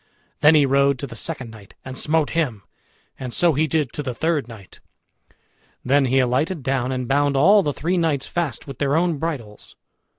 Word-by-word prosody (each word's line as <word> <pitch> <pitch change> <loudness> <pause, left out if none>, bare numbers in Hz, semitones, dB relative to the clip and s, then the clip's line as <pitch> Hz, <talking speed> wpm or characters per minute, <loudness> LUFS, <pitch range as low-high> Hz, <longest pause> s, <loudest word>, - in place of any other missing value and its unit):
Then 150 +2 +6
he 150 -2 +5
rode 140 0 +2
to 130 - -5
the 120 - -10
second 130 -3 -3
knight 105 -3 -15
and 130 0 -7
smote 155 +2 0
him, 130 -11 -1 0.6
and 130 -2 -5
so 170 +5 +2
he 155 +3 +1
did 150 -3 -1
to - - -4
the 130 -4 -5
third 160 -4 -1
knight. 110 -5 -13 1.1
Then 140 +2 +3
he 130 +1 +1
alighted 135 +6 0
down 130 -1 -1
and 130 -1 -3
bound 140 +1 +1
all 200 +9 +6
the 150 - -1
three 175 +6 -2
knights 155 -5 0
fast 170 -5 -3
with 135 -3 -9
their 140 0 +1
own 165 -2 +1
bridles. 130 -11 -6
140 Hz, 195 wpm, -22 LUFS, 130-160 Hz, 1.1 s, Then